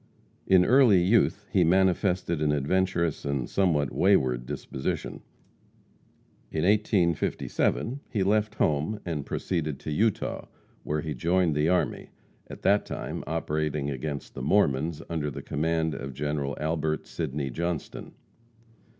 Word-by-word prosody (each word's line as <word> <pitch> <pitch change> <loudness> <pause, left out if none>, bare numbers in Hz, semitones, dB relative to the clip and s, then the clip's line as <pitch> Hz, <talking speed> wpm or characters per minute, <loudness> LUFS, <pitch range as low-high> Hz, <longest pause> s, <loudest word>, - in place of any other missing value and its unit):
In 90 -1 +5
early 120 -6 +6
youth 105 +1 +2
he 95 - +4
manifested 90 -1 +2
an 75 -1 +2
adventurous 85 +2 0
and 70 -3 -2
somewhat 80 -8 +1
wayward 65 -6 +2
disposition. 65 - -4 1.3
In 80 - -1
1857 105 - +1
he 105 -5 0
left 105 +2 +1
home 80 +7 0
and 80 -5 -3
proceeded 80 -6 -2
to 75 - -5
Utah, 105 +6 0 0.3
where 75 0 -2
he 75 -1 -4
joined 85 +5 +1
the 75 +2 +2
army, 90 0 0 0.4
at - - -10
that 100 +1 +4
time - - -5
operating 75 -2 -1
against 70 +2 -5
the - - -6
Mormons 75 -1 +1
under 80 -3 -2
the 70 - -7
command 80 +1 0
of 70 -1 -6
General 75 -1 -2
Albert 80 0 -1
Sydney 70 -3 -3
Johnston. 85 +3 -4
80 Hz, 125 wpm, -27 LUFS, 75-95 Hz, 1.3 s, early